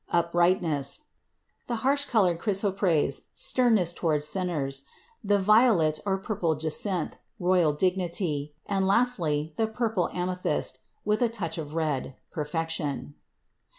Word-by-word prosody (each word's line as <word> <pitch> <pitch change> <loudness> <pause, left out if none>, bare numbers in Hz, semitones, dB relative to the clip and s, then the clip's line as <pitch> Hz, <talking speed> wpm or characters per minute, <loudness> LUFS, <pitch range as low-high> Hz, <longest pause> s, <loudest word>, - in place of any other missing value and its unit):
uprightness; 170 - +1 0.7
the 240 - -1
harsh 285 +1 +3
colored 185 -10 +2
Chrysoprase, 190 -8 +1
sternness 220 -9 +2
towards 155 -4 0
sinners; 150 -6 -2 0.4
the 205 0 +3
violet 200 -7 +4
or 190 -1 +2
purple 190 -5 -1
Jacinth, 160 +3 -1 0.2
royal 180 -3 +3
dignity, 170 -3 -1
and, 195 -1 0
lastly, 170 -10 +2
the 225 - +1
purple 220 -4 -1
Amethyst, 180 0 -1 0.3
with 210 +2 +1
a 240 - +3
touch 185 -8 -3
of 150 0 -6
red, 150 -5 -1 0.2
perfection. 150 -3 -3
175 Hz, 115 wpm, -27 LUFS, 155-205 Hz, 0.7 s, violet